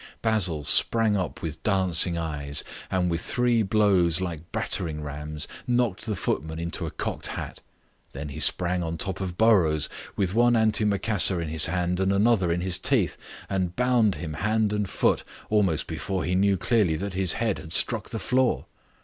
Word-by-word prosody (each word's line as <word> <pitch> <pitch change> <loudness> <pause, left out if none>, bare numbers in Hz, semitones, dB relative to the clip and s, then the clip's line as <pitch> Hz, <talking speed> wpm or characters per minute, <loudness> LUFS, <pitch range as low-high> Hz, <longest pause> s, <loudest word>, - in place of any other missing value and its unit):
Basil 95 -9 +2
sprang 110 +8 +4
up 95 -3 -4
with 80 -2 -5
dancing 90 -4 +2
eyes, 75 -3 -1 0.3
and 90 -2 0
with 85 +1 -2
three 120 +1 +1
blows 95 -5 +3
like 85 -3 -6
battering 80 -4 -3
rams 75 +1 -5 0.2
knocked 120 -4 0
the 105 - -1
footman 80 -3 -3
into 85 0 -4
a - - -4
cocked - - -5
hat. - - -7 0.5
Then 70 +2 -7
he 70 - -7
sprang 90 0 +2
on 85 -1 -4
top 95 +3 -4
of 90 -2 -5
Burrows, 90 -10 +3 0.3
with 95 -2 -1
one 120 +2 +3
antimacassar 105 -3 +2
in 85 -2 -4
his 80 0 +3
hand 90 +1 -1
and 95 0 +1
another 100 -3 +2
in 85 +1 -1
his 90 -1 +2
teeth, - - +1 0.3
and 90 -3 -2
bound 125 -5 +2
him 80 -3 -6
hand 110 -1 +1
and 105 -2 -2
foot - - +1 0.3
almost 95 -7 +1
before 95 +3 -4
he 90 - -2
knew 100 +1 +2
clearly 105 -5 +1
that 95 +4 -4
his 95 -2 +4
head 110 -3 -1
had 80 - -11
struck - - +1
the - - -4
floor. 130 0 0
95 Hz, 175 wpm, -25 LUFS, 85-105 Hz, 0.5 s, sprang